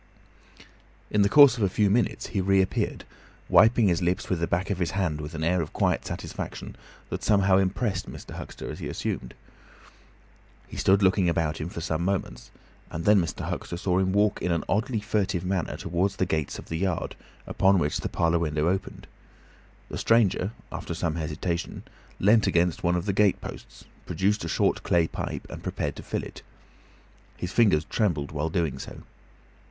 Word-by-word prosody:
In 105 - +3
the 100 - +4
course 140 +2 +8
of - - +1
a 100 - +3
few 105 +3 +2
minutes 120 +3 +1
he 100 - +1
reappeared, 95 0 +1 0.4
wiping 110 +1 +5
his 85 -1 +1
lips 90 +2 -1
with 90 - +1
the 85 - 0
back 90 +4 -1
of 95 - -2
his 90 - 0
hand 80 -6 0
with 75 +2 -7
an 80 - -3
air 90 +2 +2
of 80 - -6
quiet - - 0
satisfaction - - -6 0.4
that - - -4
somehow 100 -2 +4
impressed 95 0 0
Mr. - - -10
Huxter - - -8
as - - -8
assumed. - - -4 1.3
He - - -11
stood 95 +1 +3
looking 95 -1 +3
about 80 -2 -1
him 80 - -3
for 85 - -6
some 80 0 -1
moments, 90 -10 -2 0.4
and 85 - -5
then 105 -2 +6
Mr. 85 - -4
Huxter 85 - -4
saw 90 0 +1
him 95 0 +1
walk 105 +1 +2
in 90 - 0
an 85 - 0
oddly 110 +2 0
furtive 100 -4 -1
manner 95 -2 -1
towards 95 +3 -1
the 95 - 0
gates 80 -4 -2
of - - -10
the 80 - -3
yard, 95 -2 -1 0.3
upon 95 0 +3
which 75 -4 0
the - - -3
parlour 85 0 +1
window 80 0 0
opened. 95 +1 -3 0.8
The - - -5
stranger, 105 -5 +3 0.2
after 85 - -5
some 85 -2 -1
hesitation, 85 +2 -3 0.4
leant 105 +3 +4
against 85 0 +1
one 85 0 +2
of 90 - -2
the 100 - 0
gate 100 -1 +3
posts, - - -10 0.2
produced 100 +1 0
a - - -4
short - - +1
clay 85 -2 +2
pipe, - - -5
and - - -7
prepared 75 -2 -3
to - - -6
fill - - -3
it. - - -10 1.0
His 90 - -4
fingers 100 -10 +4
trembled 80 -10 -1
while 75 +1 -2
doing 80 -3 -1
so. - - -9
90 Hz, 185 wpm, -26 LUFS, 85-100 Hz, 1.3 s, course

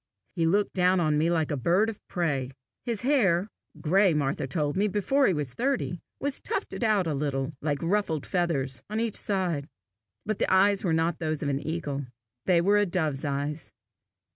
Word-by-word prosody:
He 165 -2 +2
looked 200 +4 +2
down 185 0 +3
on 155 -3 +2
me 160 +2 +2
like 160 -2 +1
a - - +1
bird 175 - +2
of 225 -2 -5
prey. 145 -8 -1 0.3
His 235 -2 -2
hair 205 -10 +3 0.3
gray, 185 +1 +3
Martha 140 -2 -1
told 145 +1 -1
me, 200 +3 +2
before 210 +8 +2
he - - +3
was 145 -4 -3
thirty 250 - -1 0.2
was 280 0 -3
tufted - - -3
out 210 -4 +3
a 160 - -1
little, 140 0 -2
like 145 -1 -1
ruffled 170 -4 0
feathers, 140 -8 -1
on 215 +1 -2
each 230 -2 -1
side. 180 -8 -1 0.6
But 215 -1 -2
the - - +1
eyes 195 +2 +4
were 180 - +1
not 160 +1 +1
those 155 -2 -2
of 145 - 0
an 140 -1 0
eagle; 145 -4 -3 0.4
they 175 -2 +5
were 200 +4 +4
a 205 -1 +3
dove's 155 -6 -1
eyes. 145 +2 -3
170 Hz, 190 wpm, -27 LUFS, 150-200 Hz, 0.6 s, they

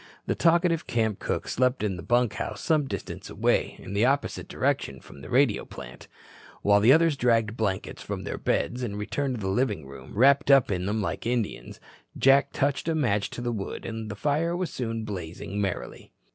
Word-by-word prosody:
The - - 0
talkative 170 0 +2
camp 110 -3 0
cook - - -2
slept 125 -1 +1
in 100 -3 0
the 90 - -7
bunkhouse 120 +3 0
some 155 -4 +2
distance - - -6
away, - - +1
in 95 - -9
the 100 +2 +2
opposite 140 +3 0
direction 65 -1 -1
from 70 - -14
the - - -10
radio 125 -4 +3
plant. 60 +1 -11 0.6
While 100 0 +5
the 110 +5 +6
others 160 +1 +5
dragged 115 -4 +2
blankets 100 -5 -2
from - - -5
their - - -5
beds 125 +2 0
and 105 -5 -3
returned 125 +6 -2
to 110 - -6
the 95 - -2
living 100 - 0
room, 70 +7 -11
wrapped 140 +5 +5
up 135 -6 +6
in 90 -1 -1
them 105 +1 0
like 105 - -3
Indians, 120 -3 -2 0.4
Jack 140 +1 +5
touched 140 +2 0
a 165 - +1
match 105 -10 +1
to - - -7
the 120 0 -1
wood 100 -4 -5
and 115 -1 -5
the 105 - -5
fire 155 - 0
soon 115 -7 -4
was - - -6
blazing 95 0 -5
merrily. 95 -3 -4
115 Hz, 195 wpm, -27 LUFS, 100-135 Hz, 0.6 s, the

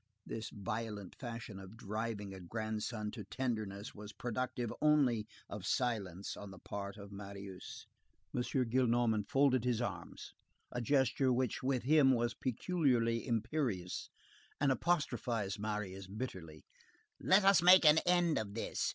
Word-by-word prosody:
This 115 -1 -5
violent 105 -1 -4
fashion 115 -5 -6
of 95 +3 -11
driving 105 -2 -4
a 95 - -8
grandson 110 +2 -3
to 110 -2 -7
tenderness 110 -3 -3
was 105 0 -9
productive 120 -1 -3
only 135 -8 +3 0.2
of - - -7
silence 100 -7 -1
on 100 - -8
the 95 - -11
part 100 +2 -6
of 100 -1 -10
Marius. 100 -1 -8 0.5
M. 125 - +1
Gillenormand 120 -4 +1
folded 135 -3 +4
his 125 -2 +1
arms; 120 - -5 0.4
a 125 - -2
gesture 130 +1 +2
which 125 -1 0
with 130 -1 0
him 140 -1 +6
was 120 -1 +1
peculiarly 125 -5 +1
imperious, 115 - -1 0.5
and 140 -1 +3
apostrophized 120 - 0
Marius 100 -3 -3
bitterly:— 95 - -6 0.5
"Let 190 +2 +5
us 195 -3 +7
make 180 0 +8
an 155 +1 +8
end 175 -4 +3
of 105 -2 -5
this. 115 - -1
115 Hz, 135 wpm, -35 LUFS, 100-130 Hz, 0.5 s, make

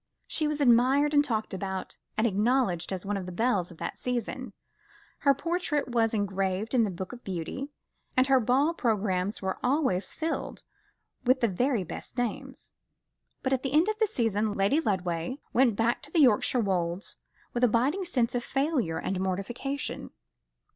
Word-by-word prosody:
She 310 - 0
was 300 0 -2
admired 270 +3 +4
and 290 0 +6
talked 220 -7 -2
about, 190 0 -4 0.2
and 220 - +2
acknowledged 210 -4 +1
as 190 0 -4
one 205 0 -1
of 185 -2 -5
the - - -5
belles 200 -2 +1
of 170 - -13
that - - -5
season; 250 0 -3 0.7
her 280 -1 +4
portrait 330 -2 -1
was 230 -2 +2
engraved 195 +1 -1
in 245 -3 +4
the - - -2
Book 185 +2 -6
of 245 - -11
Beauty, 195 - -4 0.5
and 255 - +6
her 265 -1 +5
ball 265 +7 +2
programmes 205 - 0
were 190 0 -2
always 255 -8 +1
filled 320 0 -4 0.6
with 255 +1 +3
the 235 - +4
very 235 +2 +1
best 180 - -7
names; 245 -3 -4 0.7
but 265 - +1
at 260 - +1
the 270 0 -3
end 320 +7 +4
of 430 0 -2
the 440 - +3
season, 220 - 0
Lady 200 +10 +3
Lodway 185 - -1 0.2
went 240 -3 +4
back 230 +3 +1
to 290 - -11
the 330 - +3
Yorkshire 250 -1 +4
Wolds 180 -2 -1 0.4
with 245 - -1
a - - +8
biting 270 - +1
sense 255 -10 0
of 245 -1 -1
failure 270 - 0
and 190 -1 -2
mortification. 215 +9 -3
235 Hz, 175 wpm, -28 LUFS, 195-270 Hz, 0.7 s, a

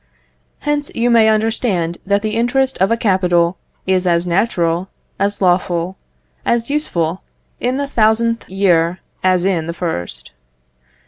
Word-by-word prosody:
Hence 295 -1 -1
you 240 +1 +2
may 225 -2 +5
understand 215 -6 0
that 200 +1 +1
the 215 - -1
interest 260 +3 +1
of 190 - +3
a 230 - +2
capital 180 -4 +2 0.3
is 185 -1 +1
as 170 0 +2
natural, 175 -1 0 0.3
as 200 0 0
lawful, 175 0 +1 0.5
as 235 +2 0
useful, 180 - -1 0.4
in 250 +2 0
the 285 - -1
thousandth 230 -2 +1
year, 180 -2 +2 0.2
as 185 -1 +2
in 170 -5 0
the 170 - -3
first. 85 - -4
190 Hz, 135 wpm, -17 LUFS, 175-230 Hz, 0.5 s, may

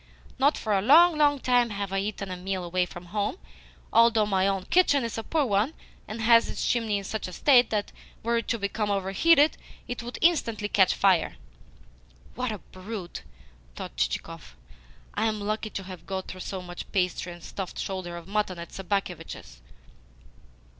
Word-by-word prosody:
Not 280 +3 +4
for 215 - -1
a 195 - +3
long, 320 - +7
long 290 -1 +4
time 245 -2 +3
have 200 -2 -4
I 195 - +1
eaten 200 -1 -4
a - - -3
meal 185 +1 -3
away 180 +1 0
from 175 +1 -10
home 210 - -1 0.6
although 230 -2 +5
my 195 -2 +2
own 195 -1 0
kitchen 285 - +3
is 230 - -3
a 225 - -2
poor 310 +2 +1
one, 215 +6 +1 0.3
and 225 +1 -6
has 230 0 +5
its - - -2
chimney 225 -4 +1
in 200 - -5
such 215 +1 -4
a - - -7
state 250 -1 +5
that, 210 -2 -1 0.3
were 235 +1 +1
it 230 - -3
to 230 - 0
become 205 0 -2
overheated, 205 - +3 0.3
it 245 - -4
would 240 +1 -7
instantly 230 -11 +2
catch 190 -3 +4
fire." 190 -4 +3 1.0
"What 250 -2 -2
a 215 - -4
brute!" 185 -1 -8 0.5
thought - - -7
Chichikov. - - -3 0.6
"I 225 - +1
am 215 -1 -1
lucky 215 +2 -2
to 195 - -5
have 185 -1 -10
got 190 -1 -4
through 185 - -8
so 190 -1 -5
much 175 0 -8
pastry 180 -1 -1
and 175 -1 -11
stuffed 190 +2 -6
shoulder 185 -3 -4
of 170 0 -10
mutton 205 -3 -1
at 170 0 -8
Sobakevitch's!" 175 - -4
205 Hz, 180 wpm, -27 LUFS, 185-230 Hz, 1.0 s, long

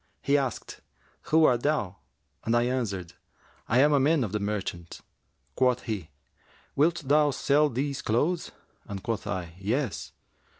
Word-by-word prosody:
He 140 - +2
asked, 135 -5 -2 0.5
'Who 160 0 +5
art 120 -4 +3
thou?' 105 -11 0 0.5
and 115 - +1
I 120 - +4
answered, 110 -9 -2 0.6
'I 120 - +4
am 150 +1 +5
a 140 - +4
man 145 +1 +3
of 105 - -3
the 105 - -1
merchants.' 100 -5 -4 0.5
Quoth 125 -1 +2
he, 100 -9 -4 0.7
'Wilt 165 +3 +2
thou 150 +2 +4
sell 145 +2 +2
these 140 +2 -2
clothes?'; 145 +10 0 0.4
and 100 -2 -7
quoth 115 -2 -3
I, 90 -4 -4
'Yes.' 115 +4 -2
125 Hz, 145 wpm, -27 LUFS, 105-145 Hz, 0.7 s, Who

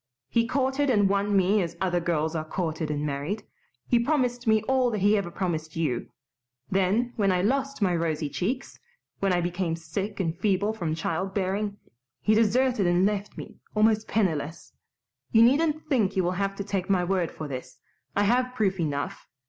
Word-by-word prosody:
He 230 0 +2
courted 270 +2 +1
and 205 -5 +4
won 200 +1 +1
me 195 +2 +3
as 170 -1 -4
other 180 -2 +1
girls 165 -1 -1
are 155 - -1
courted 160 -1 -3
and 150 0 -1
married. 145 +9 -3 0.4
He 240 - +3
promised 245 -2 0
me 220 -1 +4
all 260 +1 +2
that 220 - -2
he 205 +2 +5
ever 200 -4 -1
promised 160 -4 -3
you. 150 -8 -1 0.6
Then, 195 +6 +1
when 200 -3 +3
I 180 0 +1
lost 275 +2 0
my 180 -3 +2
rosy 160 -2 -1
cheeks 240 - -3 0.4
when 195 -1 +1
I 175 -1 +2
became 175 -1 -1
sick 190 +6 -5
and 165 -3 -1
feeble 200 +3 +1
from 170 -7 -2
child 170 +4 -2
bearing 200 +1 -1 0.4
he 215 - +2
deserted 225 -1 +3
and 175 +2 +3
left 205 0 -2
me - - -9 0.2
almost 215 0 +3
penniless. 165 -7 -1 0.6
You 225 0 +6
needn't 300 +5 +3
think 240 - +1
you 190 - +2
will 175 - +1
have 195 +1 -1
to 200 - -4
take 195 -1 -3
my 185 -2 +3
word 180 -2 0
for 155 - -7
this. 130 -2 -7 0.4
I 205 - +3
have 250 +4 +2
proof 195 -5 +1
enough. 145 -3 -3
195 Hz, 185 wpm, -26 LUFS, 170-220 Hz, 0.6 s, You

